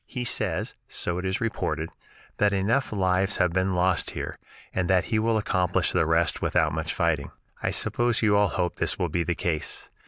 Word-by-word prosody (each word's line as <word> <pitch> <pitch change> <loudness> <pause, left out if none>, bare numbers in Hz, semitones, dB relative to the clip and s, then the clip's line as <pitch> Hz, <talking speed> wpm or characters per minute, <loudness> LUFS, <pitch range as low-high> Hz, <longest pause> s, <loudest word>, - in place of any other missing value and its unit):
He 125 -2 -4
says, - - -1
so 90 0 -2
it 90 - -4
is 95 0 0
reported, 95 -7 -2 0.5
that 105 -1 +3
enough 105 +8 +1
lives 95 -1 +1
have 90 -3 +2
been 95 0 +1
lost 90 -2 +2
here, - - -3 0.4
and 90 -1 0
that 95 -1 +4
he 110 - +4
will 115 0 +2
accomplish 95 -4 +1
the - - +2
rest 80 +1 +2
without 80 -4 +2
much 80 0 -2
fighting. 80 -5 0 0.3
I - - 0
suppose 120 -1 +1
you 105 -2 +4
all 100 0 +4
hope 90 -2 -2
this - - 0
will - - -1
be 85 - 0
the 85 0 -1
case. 80 -3 -3
95 Hz, 195 wpm, -26 LUFS, 85-105 Hz, 0.5 s, that